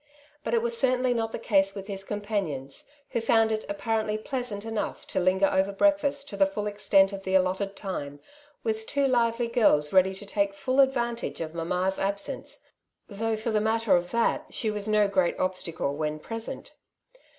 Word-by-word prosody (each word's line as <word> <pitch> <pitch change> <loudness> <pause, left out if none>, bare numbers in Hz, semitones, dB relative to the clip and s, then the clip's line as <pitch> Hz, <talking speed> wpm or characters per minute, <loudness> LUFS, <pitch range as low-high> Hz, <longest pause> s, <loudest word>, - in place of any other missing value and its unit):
But 230 -2 0
it 230 - +1
was 235 0 +1
certainly 255 0 +2
not 225 -1 -1
the - - -4
case 195 -3 +2
with 195 -1 -6
his 195 -1 -4
companions, 195 -10 -4 0.3
who 235 - -1
found 225 -1 +3
it 215 0 -2
apparently 215 +1 -1
pleasant 225 -3 -4
enough 225 -2 -3
to - - -2
linger 185 +2 +3
over 190 0 +1
breakfact 285 +4 +2
to - - -6
the 290 - +4
full 210 -8 -4
extent 200 -1 +3
of 195 - -5
the 190 0 -1
allotted 190 +2 +1
time, 145 -8 -5 0.4
with 220 0 -2
two 280 -1 +1
lively 235 -2 +1
girls 210 -11 +3
ready 190 0 +4
to 205 - -8
take 200 0 0
full 255 +8 -1
advantage 240 -3 +1
of 160 -1 -4
^^ - - -20
mamma's'' 180 +3 0
absence 200 +1 -2 0.2
— - - -31
^though, 220 +2 -1
for 225 +2 -2
the 215 -1 +2
matter 220 -2 +2
of 175 0 0
that, 230 +3 +1
she 220 - -1
was 210 0 -2
no 210 -1 +3
great 185 -3 +1
obstacle 175 -6 -2
when 155 0 -2
present. 225 +8 -6
205 Hz, 190 wpm, -27 LUFS, 190-230 Hz, 0.4 s, the